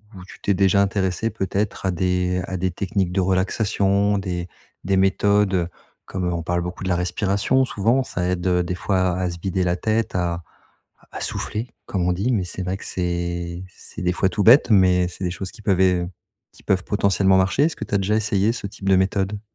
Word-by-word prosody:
ou 90 Hz, -, -10 dB
tu -, -, -14 dB
t'es 100 Hz, -, +1 dB
déjà 100 Hz, +1 st, +3 dB
intéressée 100 Hz, +2 st, 0 dB
peut-être 100 Hz, -1 st, -2 dB
à 95 Hz, -, +2 dB
des 90 Hz, 0 st, 0 dB
à 95 Hz, -, -4 dB
des 90 Hz, 0 st, -1 dB
techniques 95 Hz, 0 st, -1 dB
de 95 Hz, -, 0 dB
relaxation, 100 Hz, +2 st, +1 dB
des 90 Hz, -2 st, -3 dB, 0.4 s
des 95 Hz, 0 st, +2 dB
méthodes? 95 Hz, -1 st, +2 dB, 0.4 s
Comme 90 Hz, -2 st, -2 dB
on 85 Hz, -1 st, -3 dB
parle 85 Hz, +1 st, -1 dB
beaucoup 90 Hz, +2 st, -6 dB
de -, -, -1 dB
la 90 Hz, -, +2 dB
respiration, 100 Hz, +8 st, +1 dB
souvent, 120 Hz, +5 st, +1 dB
ça 90 Hz, -, -3 dB
aide, 90 Hz, 0 st, -1 dB
heu, 90 Hz, -1 st, +2 dB
des 90 Hz, +1 st, -3 dB
fois 95 Hz, -1 st, 0 dB
à 90 Hz, -1 st, -1 dB
se 85 Hz, -, -6 dB
vider 95 Hz, -1 st, -1 dB
la 90 Hz, -, +1 dB
tête, 110 Hz, +2 st, -1 dB
à 85 Hz, -1 st, -1 dB, 0.6 s
à -, -, -12 dB
à -, -, -6 dB
souffler, 115 Hz, +4 st, -3 dB, 0.2 s
comme 90 Hz, -3 st, -1 dB
on 90 Hz, -, +2 dB
dit. 105 Hz, +8 st, -1 dB
Mais 95 Hz, -5 st, 0 dB
c'est 95 Hz, +1 st, -6 dB
vrai 95 Hz, +1 st, -2 dB
que -, -, -10 dB
c'est 85 Hz, 0 st, -3 dB
c'est 95 Hz, -, -11 dB
des 90 Hz, 0 st, +1 dB
fois 95 Hz, +1 st, +1 dB
tout 100 Hz, +2 st, -1 dB
bête, 120 Hz, +6 st, +7 dB
mais 90 Hz, -2 st, +4 dB
c'est 95 Hz, -, -9 dB
des 90 Hz, -, -1 dB
choses 95 Hz, +1 st, -6 dB
qui 110 Hz, -1 st, -15 dB
peuvent 95 Hz, -3 st, +1 dB
é 90 Hz, -2 st, +3 dB, 0.5 s
qui -, -, -19 dB
peuvent 95 Hz, -2 st, +1 dB
potentiellement 100 Hz, -2 st, +2 dB
marcher. 95 Hz, +9 st, +2 dB
Est-ce 160 Hz, -, -1 dB
que 110 Hz, -, -5 dB
tu 100 Hz, -, -2 dB
as -, -, +5 dB
déjà 105 Hz, +3 st, +1 dB
essayé 105 Hz, 0 st, +1 dB
ce 110 Hz, -4 st, -5 dB
type 100 Hz, 0 st, -5 dB
de 95 Hz, -, +6 dB
méthode? 95 Hz, +2 st, 0 dB
95 Hz, 220 wpm, -22 LUFS, 90-100 Hz, 0.6 s, bête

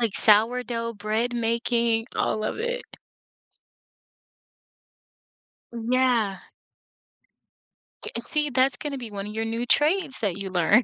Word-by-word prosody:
like, 230 Hz, -4 st, +1 dB
sourdough 230 Hz, +2 st, +2 dB
bread 220 Hz, +4 st, -1 dB
making, 230 Hz, 0 st, 0 dB
all 215 Hz, -, 0 dB
of 215 Hz, -, -3 dB
it. 485 Hz, +2 st, -2 dB, 2.9 s
Yeah. 235 Hz, -3 st, +1 dB, 1.6 s
J -, -, -6 dB
see, 300 Hz, -1 st, +4 dB
that's 260 Hz, 0 st, +2 dB
gonna 280 Hz, -3 st, -5 dB
be 235 Hz, -3 st, -7 dB
one 200 Hz, -1 st, -6 dB
of 210 Hz, -, -7 dB
your 225 Hz, 0 st, -2 dB
new 230 Hz, +2 st, -3 dB
trades 300 Hz, +1 st, +2 dB
that 200 Hz, -4 st, -1 dB
you 195 Hz, -2 st, -6 dB
learn. 190 Hz, +7 st, +4 dB
230 Hz, 115 wpm, -25 LUFS, 215-255 Hz, 2.9 s, see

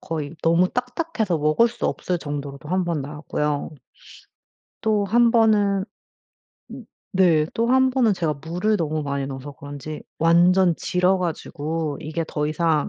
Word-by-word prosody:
거의 155 Hz, -2 st, -5 dB
너무 170 Hz, +2 st, +3 dB
딱딱해서 245 Hz, -, -2 dB
먹을 155 Hz, +10 st, +3 dB
수 235 Hz, -, -3 dB
없을 180 Hz, -1 st, -2 dB
정도로도 145 Hz, -2 st, -6 dB
1 185 Hz, +2 st, +1 dB
번 170 Hz, -4 st, -2 dB
나왔고요. 150 Hz, +1 st, -3 dB, 1.1 s
또 215 Hz, -2 st, +1 dB
1 235 Hz, +4 st, +4 dB
번은 210 Hz, -4 st, +3 dB, 0.9 s
으 -, -, -9 dB, 0.3 s
네 165 Hz, -5 st, +4 dB
또 230 Hz, +1 st, 0 dB
1 260 Hz, 0 st, +4 dB
번은 250 Hz, -4 st, +3 dB
제가 165 Hz, -5 st, -1 dB
물을 180 Hz, +7 st, 0 dB
너무 155 Hz, -3 st, -2 dB
많이 140 Hz, -1 st, -2 dB
넣어서 135 Hz, +1 st, -7 dB
그런지 145 Hz, +2 st, -8 dB, 0.2 s
완전 175 Hz, +2 st, +4 dB
질어 180 Hz, +1 st, +1 dB
가지고 160 Hz, -3 st, -3 dB
이게 160 Hz, +2 st, -3 dB
더 150 Hz, -1 st, -2 dB
이상 155 Hz, -1 st, +1 dB
170 Hz, 260 characters per minute, -23 LUFS, 150-200 Hz, 1.1 s, 1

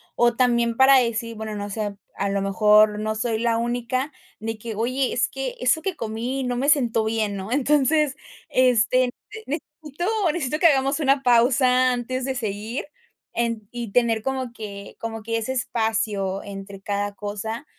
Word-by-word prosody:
O 240 Hz, -1 st, +3 dB
también 235 Hz, -2 st, +2 dB
para 265 Hz, +2 st, +7 dB
decir, 230 Hz, -2 st, 0 dB
bueno, 220 Hz, -1 st, -5 dB
no 205 Hz, 0 st, -4 dB
sé, 205 Hz, -1 st, -3 dB, 0.2 s
a 200 Hz, -, 0 dB
lo 200 Hz, 0 st, 0 dB
mejor 210 Hz, +2 st, +4 dB
no 215 Hz, 0 st, -2 dB
soy 220 Hz, 0 st, -1 dB
la 230 Hz, 0 st, +1 dB
única 245 Hz, +4 st, -1 dB, 0.3 s
de 225 Hz, 0 st, -3 dB
que: 220 Hz, 0 st, -6 dB
"Oye, 255 Hz, +4 st, 0 dB
es 240 Hz, -, +1 dB
que 270 Hz, -2 st, -4 dB
eso 255 Hz, +6 st, +3 dB
que 375 Hz, +2 st, -2 dB
comí 235 Hz, +3 st, -3 dB
no 250 Hz, -1 st, -2 dB
me 270 Hz, +3 st, 0 dB
siento 240 Hz, -7 st, +3 dB
bien", 220 Hz, -2 st, -1 dB
¿no? 195 Hz, +5 st, -4 dB
Entonces, 290 Hz, +1 st, +2 dB, 0.3 s
este, 250 Hz, 0 st, +3 dB, 0.4 s
necesito, 300 Hz, +2 st, -5 dB, 0.3 s
necesito 305 Hz, -3 st, -2 dB
que 340 Hz, -, +6 dB
hagamos 275 Hz, 0 st, +2 dB
una 275 Hz, -1 st, +2 dB
pausa 250 Hz, +1 st, +4 dB
antes 250 Hz, +1 st, -3 dB
de 265 Hz, -1 st, -2 dB
seguir, 220 Hz, +1 st, -3 dB, 0.5 s
en 230 Hz, -3 st, -1 dB
y, 235 Hz, -3 st, -5 dB
tener 230 Hz, -2 st, +2 dB
como 260 Hz, 0 st, -3 dB
que 200 Hz, -3 st, -8 dB
como 225 Hz, -1 st, -5 dB
que 230 Hz, +1 st, -1 dB
ese 225 Hz, +4 st, -2 dB
espacio 220 Hz, -5 st, -1 dB
entre 195 Hz, 0 st, -9 dB
cada 205 Hz, 0 st, -2 dB
cosa. 210 Hz, +5 st, -5 dB
235 Hz, 170 wpm, -23 LUFS, 215-260 Hz, 0.5 s, para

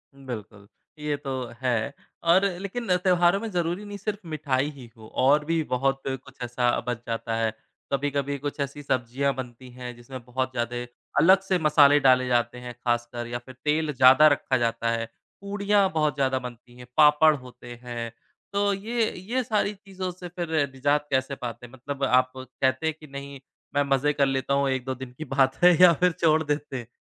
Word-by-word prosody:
बिल्कुल, 110 Hz, -6 st, -9 dB, 0.3 s
ये 150 Hz, -1 st, -1 dB
तो 140 Hz, -1 st, -6 dB, 0.3 s
है 125 Hz, 0 st, 0 dB, 0.4 s
और 190 Hz, +3 st, +4 dB
लेकिन 200 Hz, 0 st, -1 dB
त्योहारों 180 Hz, 0 st, +3 dB
में 225 Hz, +1 st, -4 dB
ज़रूरी 175 Hz, +3 st, -2 dB
नहीं 205 Hz, 0 st, -7 dB
सिर्फ़ 205 Hz, +1 st, -4 dB
मिठाई 145 Hz, -3 st, 0 dB
ही 130 Hz, -4 st, -12 dB
हो 110 Hz, -, -12 dB, 0.2 s
और 150 Hz, +2 st, +4 dB
भी 165 Hz, +1 st, +1 dB
बहुत 135 Hz, +2 st, +1 dB
कुछ 135 Hz, 0 st, -6 dB
ऐसा 120 Hz, 0 st, 0 dB, 0.2 s
बच 120 Hz, -2 st, -1 dB
जाता 115 Hz, 0 st, -2 dB
है। 115 Hz, -1 st, 0 dB, 0.4 s
कभी-कभी 140 Hz, 0 st, -1 dB
कुछ 145 Hz, +1 st, -4 dB
ऐसी 140 Hz, +1 st, -3 dB
सब्ज़ियाँ 130 Hz, +1 st, 0 dB
बनती 125 Hz, 0 st, -8 dB
हैं, 125 Hz, -1 st, -8 dB
जिसमें 120 Hz, +2 st, -9 dB
बहुत 130 Hz, +1 st, -2 dB
ज़्यादे 120 Hz, 0 st, -3 dB, 0.4 s
अलग 190 Hz, +3 st, +6 dB
से 190 Hz, -1 st, 0 dB
मसाले 150 Hz, -2 st, +6 dB
डाले 130 Hz, -2 st, +4 dB
जाते 120 Hz, 0 st, +1 dB
हैं 125 Hz, 0 st, -7 dB
ख़ासकर 120 Hz, 0 st, -2 dB
या 120 Hz, +1 st, -4 dB
फिर 130 Hz, +2 st, -14 dB
तेल 150 Hz, 0 st, +1 dB
ज़्यादा 130 Hz, +3 st, +7 dB
रखा 140 Hz, -3 st, +2 dB
जाता 115 Hz, -1 st, 0 dB
है। 115 Hz, 0 st, -1 dB, 0.4 s
पूड़ियाँ 200 Hz, 0 st, +1 dB
बहुत 155 Hz, -3 st, +1 dB
ज़्यादा 135 Hz, -1 st, +1 dB
बनती 120 Hz, -1 st, -10 dB
हैं, 125 Hz, -1 st, -12 dB
पापड़ 150 Hz, +1 st, +6 dB
होते 125 Hz, -2 st, -11 dB
हैं, 120 Hz, -2 st, -5 dB, 0.4 s
तो 200 Hz, 0 st, +2 dB
ये 225 Hz, +3 st, -1 dB, 0.2 s
ये 260 Hz, 0 st, +2 dB
सारी 210 Hz, -2 st, 0 dB
चीज़ों 190 Hz, -2 st, -6 dB
से 180 Hz, 0 st, -9 dB
फिर 175 Hz, -1 st, -5 dB, 0.2 s
निज़ात 145 Hz, +2 st, +1 dB
कैसे 130 Hz, +1 st, 0 dB
पाते 120 Hz, -2 st, -7 dB
हैं? 120 Hz, -, -15 dB
मतलब, 140 Hz, +2 st, -6 dB
आप 130 Hz, -1 st, +3 dB
कहते 130 Hz, +3 st, -1 dB
हैं 160 Hz, -, 0 dB
कि 155 Hz, -, -13 dB
नहीं 140 Hz, 0 st, -8 dB, 0.4 s
मैं 145 Hz, -, +4 dB
मजे 140 Hz, +1 st, +1 dB
कर 140 Hz, -1 st, +2 dB
लेता 135 Hz, 0 st, -1 dB
हूँ, 140 Hz, 0 st, +2 dB
1-2 130 Hz, 0 st, -2 dB
दिन 130 Hz, -1 st, -8 dB
की 155 Hz, -, -6 dB
बात 135 Hz, -1 st, +2 dB
है 180 Hz, -1 st, +8 dB
या 180 Hz, -2 st, +9 dB
फिर 180 Hz, -1 st, +5 dB
छोड़ 160 Hz, -1 st, +2 dB
देते 145 Hz, -2 st, -3 dB
हैं? 120 Hz, -2 st, -7 dB
135 Hz, 190 wpm, -26 LUFS, 125-160 Hz, 0.4 s, या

